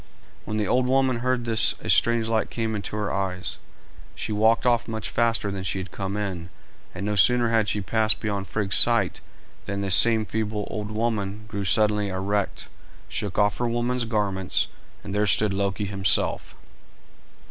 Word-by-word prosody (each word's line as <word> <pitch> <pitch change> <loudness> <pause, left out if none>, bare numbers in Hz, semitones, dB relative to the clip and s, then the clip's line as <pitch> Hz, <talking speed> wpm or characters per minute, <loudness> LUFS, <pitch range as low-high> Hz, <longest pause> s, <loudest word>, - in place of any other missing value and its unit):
When 110 +1 -3
the 105 -2 0
old 125 +3 +2
woman 130 -1 +2
heard 125 0 -1
this 115 -1 +2
a - - -9
strange 115 -1 +3
light 110 -1 0
came 115 -1 -2
into 105 0 -5
her 105 -1 -2
eyes; 95 -2 -3 0.6
she - - -5
walked 110 +3 +2
off 120 -1 +2
much 110 -2 -4
faster 115 -3 +1
than 95 -1 -5
she 95 +1 -2
had 95 +1 -6
come 100 0 -4
in, 95 -5 -4 0.5
and 95 +2 -4
no 105 0 -1
sooner 120 +3 +4
had 110 -2 +2
she 105 - -1
passed 110 +3 +1
beyond 100 -3 -3
Frigg's 100 -2 0
sight - - +3 0.4
than 100 -1 -3
this 95 -1 +5
same 110 +2 +5
feeble 105 -1 -3
old 105 -1 -4
woman 105 -2 -2
grew 100 -2 -4
suddenly 105 0 +2
erect, 100 +1 -2 0.4
shook 100 -3 -3
off 105 0 +2
her 120 -1 0
woman's 120 +1 -1
garments, 100 -4 -1 0.3
and 100 - -7
there 105 +1 +1
stood 105 0 +2
Loki 100 +1 -1
himself. 95 -1 0
105 Hz, 175 wpm, -24 LUFS, 100-115 Hz, 0.6 s, this